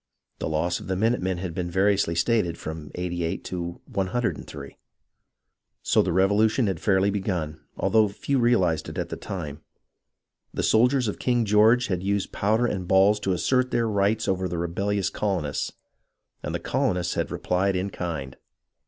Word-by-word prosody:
The -, -, -2 dB
loss 85 Hz, +3 st, 0 dB
of -, -, -10 dB
the 95 Hz, -, -1 dB
minute 115 Hz, +6 st, +1 dB
men 95 Hz, 0 st, -1 dB
has 90 Hz, -1 st, -4 dB
been 85 Hz, +1 st, -3 dB
variously 95 Hz, -1 st, +2 dB
stated 85 Hz, -1 st, +1 dB
from 80 Hz, -1 st, -7 dB
88 85 Hz, -2 st, -3 dB
to 85 Hz, -1 st, -5 dB
103. 100 Hz, +5 st, -3 dB, 1.0 s
So -, -, +4 dB
the 90 Hz, -, -1 dB
Revolution 105 Hz, +6 st, +3 dB
had 95 Hz, -5 st, -1 dB
fairly 100 Hz, -1 st, +2 dB
begun, 90 Hz, -6 st, -3 dB, 0.2 s
although 110 Hz, -1 st, +3 dB
few 130 Hz, +7 st, -1 dB
real 120 Hz, -4 st, +4 dB
ized 80 Hz, -3 st, -1 dB
it -, -, -8 dB
at -, -, -2 dB
the -, -, -4 dB
time. 80 Hz, -7 st, -6 dB, 0.9 s
The -, -, -1 dB
soldiers 125 Hz, +2 st, +3 dB
of 105 Hz, -, -3 dB
King 120 Hz, -2 st, +1 dB
George 110 Hz, +4 st, +5 dB
had 90 Hz, -5 st, -2 dB
used 100 Hz, +1 st, -1 dB
powder 110 Hz, +4 st, +1 dB
and 95 Hz, -6 st, -2 dB
balls 100 Hz, +2 st, +4 dB
to 95 Hz, -2 st, 0 dB
assert 125 Hz, +8 st, +1 dB
their 115 Hz, -2 st, +1 dB
rights 105 Hz, +1 st, +1 dB
over 95 Hz, -1 st, 0 dB
the 85 Hz, -1 st, -4 dB
rebellious 95 Hz, +3 st, -1 dB
colonists, 95 Hz, -8 st, -2 dB, 0.7 s
and -, -, -4 dB
the -, -, -1 dB
colonists 90 Hz, -1 st, 0 dB
had -, -, -1 dB
replied 95 Hz, +2 st, 0 dB
in 95 Hz, +2 st, -2 dB
kind. 75 Hz, -7 st, -5 dB
95 Hz, 170 wpm, -25 LUFS, 85-105 Hz, 1.0 s, George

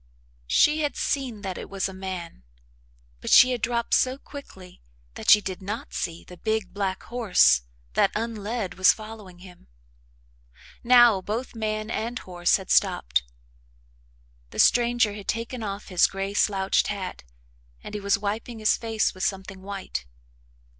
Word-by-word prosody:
She 300 Hz, -, +4 dB
had 295 Hz, -1 st, -1 dB
seen 250 Hz, -7 st, -2 dB
that 190 Hz, -2 st, -4 dB
it -, -, -8 dB
was 195 Hz, -1 st, -2 dB
a 190 Hz, -, -8 dB
man, 185 Hz, -, -7 dB, 0.8 s
but -, -, -6 dB
she 255 Hz, -, +8 dB
had 245 Hz, -3 st, -2 dB
dropped 235 Hz, 0 st, -1 dB
so 260 Hz, +1 st, +3 dB
quickly 190 Hz, -12 st, -12 dB, 0.3 s
that -, -, -4 dB
she 210 Hz, -, +8 dB
did 190 Hz, -2 st, -5 dB
not 210 Hz, +8 st, -6 dB
see 170 Hz, 0 st, -4 dB
the 180 Hz, -, -13 dB
big, 220 Hz, -2 st, -2 dB
black 195 Hz, -2 st, -2 dB
horse 190 Hz, -, +3 dB, 0.3 s
that, -, -, +3 dB
unled, 220 Hz, -2 st, -3 dB
was 190 Hz, -, +6 dB
following 215 Hz, -4 st, -11 dB
him. 180 Hz, -1 st, -16 dB, 1.2 s
Now 240 Hz, -5 st, +6 dB
both 225 Hz, +7 st, -4 dB
man 215 Hz, -1 st, -3 dB
and 235 Hz, +2 st, -3 dB
horse 175 Hz, -4 st, +1 dB
had 190 Hz, -2 st, -7 dB
stopped. -, -, +2 dB, 1.3 s
The -, -, -12 dB
stranger 240 Hz, -3 st, +4 dB
had 205 Hz, -1 st, -9 dB
taken 230 Hz, +2 st, -3 dB
off 200 Hz, -1 st, -5 dB
his 180 Hz, -2 st, +4 dB
gray 195 Hz, +1 st, -4 dB
slouched 195 Hz, -2 st, +2 dB
hat 195 Hz, -3 st, -5 dB, 0.6 s
and -, -, -9 dB
he 210 Hz, -, -4 dB
was 200 Hz, 0 st, +2 dB
wiping 215 Hz, +4 st, -4 dB
his 215 Hz, -1 st, +3 dB
face 225 Hz, -1 st, 0 dB
with 185 Hz, -, -6 dB
something 190 Hz, 0 st, -3 dB
white. 195 Hz, -, -6 dB
205 Hz, 155 wpm, -25 LUFS, 190-230 Hz, 1.3 s, she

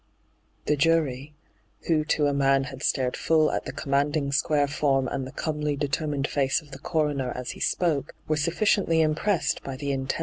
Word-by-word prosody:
The 150 Hz, -, +2 dB
jury, 150 Hz, -2 st, +1 dB, 0.5 s
who 155 Hz, -2 st, +2 dB
to 150 Hz, -1 st, +1 dB
a 145 Hz, -, +2 dB
man 135 Hz, -1 st, +3 dB
had 130 Hz, 0 st, -8 dB
stared 125 Hz, -1 st, 0 dB
full 155 Hz, -1 st, +2 dB
at -, -, -2 dB
the -, -, -4 dB
commanding, 140 Hz, +1 st, 0 dB
square 145 Hz, 0 st, +2 dB
form 140 Hz, -2 st, +1 dB
and 135 Hz, -1 st, -3 dB
the -, -, -9 dB
comely, 150 Hz, -2 st, -2 dB
determined 145 Hz, 0 st, -1 dB
face 135 Hz, -2 st, +1 dB
of 150 Hz, -3 st, -18 dB
the -, -, -9 dB
coroner 145 Hz, -6 st, -1 dB
as 125 Hz, -1 st, -4 dB
he -, -, -11 dB
spoke, 155 Hz, -6 st, 0 dB
were 155 Hz, -, +1 dB
sufficiently 170 Hz, +1 st, +2 dB
impressed 160 Hz, +5 st, +1 dB
by 135 Hz, -, -6 dB
the 140 Hz, +1 st, -3 dB
intense 135 Hz, +1 st, -2 dB
145 Hz, 180 wpm, -26 LUFS, 135-155 Hz, 0.5 s, man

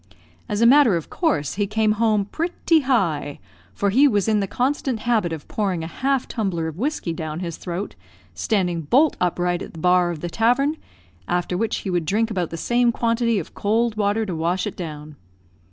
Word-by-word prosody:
As 210 Hz, +1 st, -1 dB
a -, -, +6 dB
matter 255 Hz, -4 st, +6 dB
of 165 Hz, -, -7 dB
course, 285 Hz, -, 0 dB
he 205 Hz, +1 st, -1 dB
came 215 Hz, +1 st, +1 dB
home 215 Hz, -2 st, +2 dB
"pretty 330 Hz, -, +1 dB
high;" 175 Hz, -, 0 dB, 0.3 s
for 200 Hz, -, 0 dB
he 270 Hz, +7 st, +5 dB
was 205 Hz, -6 st, +1 dB
in 215 Hz, -1 st, +3 dB
the 195 Hz, -, -1 dB
constant 255 Hz, 0 st, -1 dB
habit 220 Hz, -8 st, +1 dB
of 160 Hz, -2 st, -6 dB
pouring 190 Hz, -6 st, -2 dB
a 165 Hz, -, -9 dB
half 270 Hz, -1 st, +1 dB
tumbler 185 Hz, -7 st, -2 dB
of 160 Hz, +2 st, -7 dB
whiskey 260 Hz, -, -2 dB
down 160 Hz, 0 st, -5 dB
his 170 Hz, -3 st, -5 dB
throat, 180 Hz, +3 st, -5 dB, 0.4 s
standing 180 Hz, -6 st, 0 dB
bolt 265 Hz, -, +3 dB
upright 175 Hz, 0 st, 0 dB
at -, -, -8 dB
the 165 Hz, -, -9 dB
bar 180 Hz, +1 st, +3 dB
of 165 Hz, -3 st, -5 dB
the 175 Hz, -, -3 dB
tavern, 250 Hz, -, +2 dB, 0.5 s
after 180 Hz, 0 st, -1 dB
which 220 Hz, +4 st, -1 dB
he 190 Hz, -, -4 dB
would 175 Hz, -2 st, 0 dB
drink 220 Hz, +7 st, 0 dB
about 180 Hz, -5 st, -1 dB
the 165 Hz, -, -6 dB
same 240 Hz, +7 st, +2 dB
quantity 230 Hz, -1 st, +1 dB
of 175 Hz, -, -5 dB
cold 225 Hz, +2 st, 0 dB
water 210 Hz, +1 st, 0 dB
to 190 Hz, -, -4 dB
wash 170 Hz, +5 st, -1 dB
it 210 Hz, -, -5 dB
down. 150 Hz, -3 st, -7 dB
205 Hz, 200 wpm, -22 LUFS, 175-235 Hz, 0.5 s, a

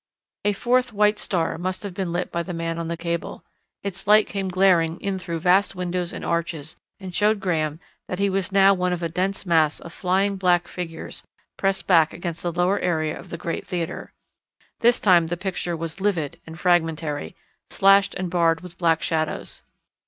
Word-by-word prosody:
A 205 Hz, -, +3 dB
fourth 250 Hz, +4 st, +1 dB
white 210 Hz, 0 st, +3 dB
star 165 Hz, -3 st, -1 dB
must 185 Hz, +2 st, -3 dB
have 200 Hz, -3 st, -5 dB
been 185 Hz, -1 st, -3 dB
lit 175 Hz, +1 st, -2 dB
by 170 Hz, -, -1 dB
the 175 Hz, 0 st, -5 dB
man 165 Hz, 0 st, -3 dB
on 165 Hz, -, -3 dB
the 170 Hz, 0 st, -3 dB
cable. 170 Hz, 0 st, -4 dB, 0.4 s
Its 195 Hz, 0 st, -6 dB
light 210 Hz, +1 st, +6 dB
came 195 Hz, -1 st, -3 dB
glaring 180 Hz, -3 st, +3 dB
in 195 Hz, -1 st, -2 dB
through 170 Hz, -3 st, -4 dB
vast 185 Hz, +3 st, +3 dB
windows 180 Hz, -1 st, -2 dB
and -, -, -6 dB
arches 165 Hz, -3 st, -2 dB, 0.2 s
and 190 Hz, -2 st, -8 dB
showed 210 Hz, +2 st, +2 dB
Graham 160 Hz, -5 st, -1 dB, 0.3 s
that 180 Hz, -, -4 dB
he 200 Hz, +1 st, +2 dB
was 195 Hz, -1 st, -1 dB
now 195 Hz, 0 st, +6 dB
one 180 Hz, -1 st, 0 dB
of 175 Hz, -1 st, -4 dB
a 165 Hz, -, -1 dB
dense 190 Hz, +4 st, -2 dB
mass 160 Hz, -4 st, +3 dB
of 170 Hz, -, -11 dB
flying 195 Hz, +2 st, +1 dB
black 180 Hz, -2 st, +2 dB
figures 165 Hz, -2 st, -7 dB, 0.3 s
pressed 195 Hz, 0 st, -1 dB
back 165 Hz, -4 st, +4 dB
across 170 Hz, -1 st, -5 dB
the 175 Hz, -, -2 dB
lower 180 Hz, +4 st, +1 dB
area 155 Hz, -3 st, 0 dB
of -, -, -11 dB
the 170 Hz, -, -5 dB
great 165 Hz, +1 st, -4 dB
theatre. 175 Hz, -3 st, -4 dB, 0.7 s
This 240 Hz, +1 st, +4 dB
time 175 Hz, -5 st, +5 dB
the 175 Hz, +1 st, -3 dB
picture 175 Hz, -2 st, -3 dB
was 165 Hz, +3 st, -6 dB
livid 180 Hz, -8 st, -1 dB
and 160 Hz, 0 st, -9 dB
fragmentary, 160 Hz, -, 0 dB, 0.3 s
slashed 195 Hz, 0 st, +4 dB
and 180 Hz, -2 st, -3 dB
barred 165 Hz, -2 st, +2 dB
with 180 Hz, -1 st, -10 dB
black 165 Hz, -2 st, +2 dB
shadows. 155 Hz, -2 st, -2 dB
180 Hz, 190 wpm, -23 LUFS, 165-195 Hz, 0.7 s, light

